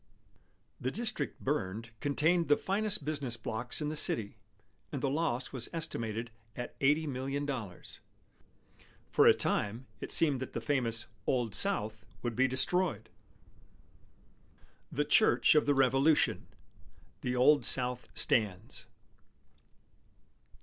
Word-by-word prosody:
The 130 - -2
district 235 - -4
burned 115 -5 -3
contained 160 +4 +1
the 145 - +4
finest 205 -4 0
business 140 -6 -1
blocks 115 +4 -3
in 150 - -1
the 155 - -4
city, 110 -8 +2 0.6
and - - -3
the 135 - -1
loss 140 -5 -1
was 125 -3 -4
estimated 115 -8 -4 0.2
at 120 - -6
$80,000,000. 135 - -2 1.1
For - - +5
a - - +9
time, 115 +5 -1
it - - -6
seemed 145 -5 +5
that 130 - -6
the - - -2
famous 115 -2 -1 0.2
"Old 120 -5 0
South" 110 - -2 0.2
would 120 -2 -2
be 130 +1 +3
destroyed. 130 - +1 1.8
THE 150 +2 0
CHURCH 215 +8 +5
OF 150 -1 +3
THE 145 - +3
REVOLUTION 135 +3 +3 0.7
"The 125 0 -2
Old 140 +4 +5
South 125 -1 0
stands." 105 -1 0
130 Hz, 115 wpm, -31 LUFS, 115-150 Hz, 1.8 s, a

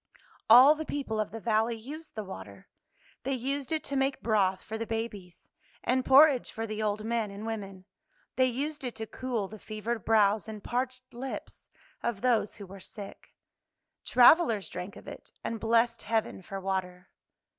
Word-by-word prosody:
All 255 +6 +10
the 315 +1 -5
people 275 -8 -3
of 215 - -1
the 225 - -7
valley 225 +1 +1
used 295 +8 -9
the 215 - -3
water. 100 - -10 0.5
They 270 +3 -2
used 270 +3 -3
it 315 -1 0
to 280 - -4
make 270 0 0
broth 195 -4 +2
for 220 - -6
the 225 0 -4
babies, 210 -5 -5 0.4
and 255 +1 +1
porridge 270 -1 +6
for 225 - -4
the 215 -1 -4
old 210 0 -1
men 230 -2 0
and 200 +2 -8
women. 195 -4 -6 0.5
They 255 0 +4
used 290 +4 -3
it 250 -2 -4
to 220 - -5
cool 235 -3 -3
the 215 +2 -11
fevered 215 +1 -4
brows 215 -2 +3
and 215 -2 -8
parched 255 +1 -3
lips 260 +3 -7 0.3
of 235 -4 -2
those 235 -4 +1
who 205 - -9
were 195 +1 -11
sick. 200 +1 -10 0.7
Travelers 245 - +5
drank 180 +2 -6
of - - -13
it, - - -10
and 230 - -3
blessed 230 +1 +2
heaven 220 -3 -1
for 195 +1 -6
water. 185 -1 -3
225 Hz, 175 wpm, -29 LUFS, 205-255 Hz, 0.7 s, All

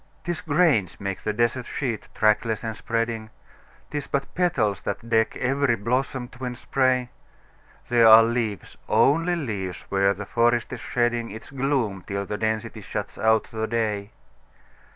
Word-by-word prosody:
'Tis 175 -1 -3
grains 145 - +2
make 100 -1 -4
the 105 - -1
desert 120 +3 0
sheet, 120 -6 -3
trackless 110 0 +2
and 110 -1 -3
spreading; 115 -1 -2 0.6
'Tis 145 -2 -3
but 140 -1 -2
petals 115 - +1
that 105 +3 -4
deck 110 -1 +2
every 135 -1 +1
blossom 125 +3 -1
twinned 125 -1 -6
spray; 130 -1 +1 0.8
There 120 -2 +5
are 110 +1 +10
leaves 115 -3 -2
only 155 +11 +3
leaves 105 - -4
where 100 0 +2
the 105 +2 -6
forest 120 +3 +1
is 125 - -5
shedding 120 -1 0
Its 110 +5 -10
gloom 130 -8 -1
till 100 0 -2
the 105 +1 -4
density 110 0 -2
shuts - - -5
out 110 0 +3
the 110 0 -2
day. 105 -3 -1
115 Hz, 150 wpm, -25 LUFS, 110-130 Hz, 0.8 s, are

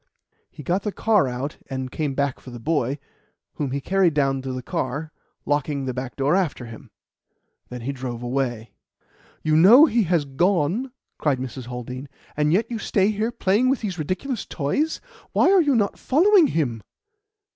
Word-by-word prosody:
He 150 - -11
got 180 +8 0
the 210 - -3
car 210 -7 +2
out 130 +4 -4
and 130 -2 -4
came 145 -4 -2
back 140 -2 -1
for - - -12
the 120 - -8
boy, 140 -1 0 0.6
whom 145 -3 -2
he 140 +2 -2
carried 180 +1 +2
down 135 -2 +1
to 130 0 -5
the 130 0 -5
car, 140 +6 -3 0.3
locking 145 -1 -1
the 130 - -2
back 125 0 -5
door 140 +5 +2
after 165 -10 -1
him. 115 -1 -11 0.8
Then 125 -1 -7
he 130 +4 -3
drove 125 -3 -6
away." 120 -3 -2 0.7
"You 155 0 +2
know 215 - +8
he 235 -6 +2
has 165 -3 +1
gone," 175 - 0 0.3
cried 145 -4 +1
Mrs. 130 -1 -6
Haldean, 125 +2 -7 0.3
"and 150 0 +1
yet 215 +7 +1
you 230 - -3
stay 200 0 +1
here 215 +3 -1
playing 235 +2 +2
with 265 - +1
these 190 -6 -4
ridiculous 190 - -3
toys. 285 - -1 0.3
Why - - +4
are 390 -2 +6
you 290 -4 +2
not 205 -3 0
following 355 +4 +5
him?" 125 - -1
150 Hz, 180 wpm, -23 LUFS, 130-200 Hz, 0.8 s, know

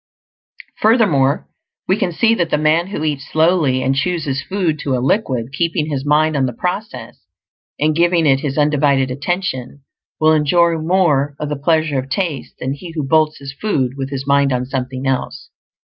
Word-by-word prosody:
Furthermore, 185 - +3 0.4
we 190 - +3
can 190 -3 -1
see 225 +7 +2
that 170 -7 0
the - - +1
man 155 +3 +2
who 195 -5 -4
eats 145 -2 -3
slowly 155 -5 +2
and 135 - +1
chews 170 +4 -1
his 140 0 -2
food 170 -2 -2
to 135 -2 -1
a - - -1
liquid, 130 - -1
keeping 165 0 -1
his 135 -2 -2
mind 150 +2 +2
on 135 -2 +1
the 125 - -4
process 180 - -5 0.6
and 155 +1 +1
giving 170 0 +2
it 135 -2 +4
his 140 -1 -4
undivided 140 -3 +2
attention, 140 -3 -3 0.4
will 155 0 +4
enjoy 165 +2 +2
more 155 -5 +1
of 150 - -3
the 150 - -2
pleasure 155 0 +1
of 130 +1 -6
taste 160 -2 -3
than 130 +1 -3
he 165 +4 -9
who 155 - -2
bolts 155 0 +2
his 135 -1 -8
food 135 - -1
with 135 -1 -4
his 135 -1 -5
mind 140 0 +3
on 125 0 -1
something 130 0 -4
else. 135 -1 -3
150 Hz, 185 wpm, -18 LUFS, 135-170 Hz, 0.6 s, it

